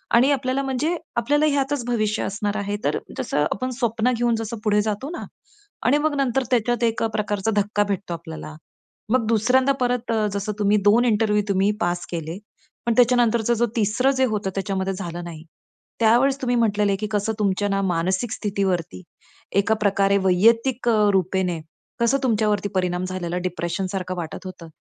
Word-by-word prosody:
आणि 255 +4 +5
आपल्याला 270 -1 0
म्हणजे 270 +6 -1 0.2
आपल्याला 290 +6 +2
ह्यातच 280 -3 0
भविष्य 215 -3 0
असणार 205 +1 -2
आहे. 205 0 -2
तर - - +1 0.2
जसं - - 0
आपण 255 - -2
स्वप्न 235 0 +1
घेऊन 240 0 +1
जसं 225 +1 -4
पुढे 210 -1 +3
जातो 215 +6 -3
ना - - -6 0.6
आणि 260 +5 +4
मग 305 0 0
नंतर 270 -2 +1
त्याच्यात 240 0 +1
एक 230 -1 +1
प्रकारचा 210 0 -1
धक्का 205 0 +1
भेटतो 200 -3 -3
आपल्याला. 160 -2 -8 0.5
मग 240 0 +2
दुसऱ्यांदा 250 +5 +3
परत 245 -1 0
अ, 220 -2 +1
जसं 200 +1 -2
तुम्ही 205 0 +3
2 225 +4 +5
इंटरव्ह्यू 210 -2 +2
तुम्ही 195 +1 +2
पास 175 -1 -1
केले 165 0 -4 0.5
पण 235 - +2
त्याच्यानंतरच 240 -2 +3
जो 235 +1 +2
3रं 230 +5 +2
जे 260 - +4
होतं 210 -5 -2
त्याच्यामध्ये 195 0 -2
झालं 175 -2 -6
नाही. 160 -2 -8 0.6
त्यावेळेस 245 +5 +3
तुम्ही 245 -1 +1
म्हंटलेले 205 -3 +2
की 215 - -3
कसं 210 +1 0
तुमच्या 205 0 +1
ना 195 0 0
मानसिक 185 +6 0
स्थितीवरती, 190 - -2 0.5
एका 200 +3 +3
प्रकारे 200 -1 +3
वैयक्तिक 230 +7 +3
अ, 210 -2 +4
रूपेने 185 -2 0 0.4
कसं 235 +3 +3
तुमच्यावरती 210 -4 +1
परिणाम 180 -1 0
झालेला, 180 -1 -3
डिप्रेशन 180 +1 -3
सारखं 185 -1 -3
वाटत 170 +2 -6
होतं. 185 -2 -9
210 Hz, 165 wpm, -23 LUFS, 190-240 Hz, 0.6 s, आणि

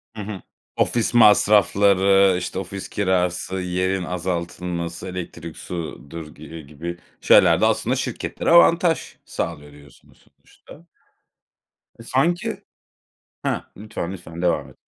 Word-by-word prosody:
Hı 105 - -6
hı. 100 -3 -6 0.3
Ofis 120 0 +1
masrafları, 100 -3 +5
işte 90 +1 -4
ofis 95 +1 -7
kirası, 95 -1 0
yerin 90 +1 -1
azaltılması, 85 0 -4
elektrik 85 -2 -7
sudur 80 -2 -7
gi 75 - -13
eee, 80 +1 -9
gibi 80 +4 -7 0.2
şeyler - - +5
de, - - +5
aslında - - +1
şirketlere - - -3
avantaj 170 -1 +4
sağlıyor, 75 0 -5
diyorsunuz 70 0 -19 0.2
sonuçta. 165 +3 -17 1.1
E, - - -10
sanki 165 +9 0 0.8
Hah, - - -2
lütfen, 105 -4 -5
lütfen 85 -2 -9
devam 75 -6 0
et. - - -19
90 Hz, 115 wpm, -22 LUFS, 85-100 Hz, 1.1 s, masrafları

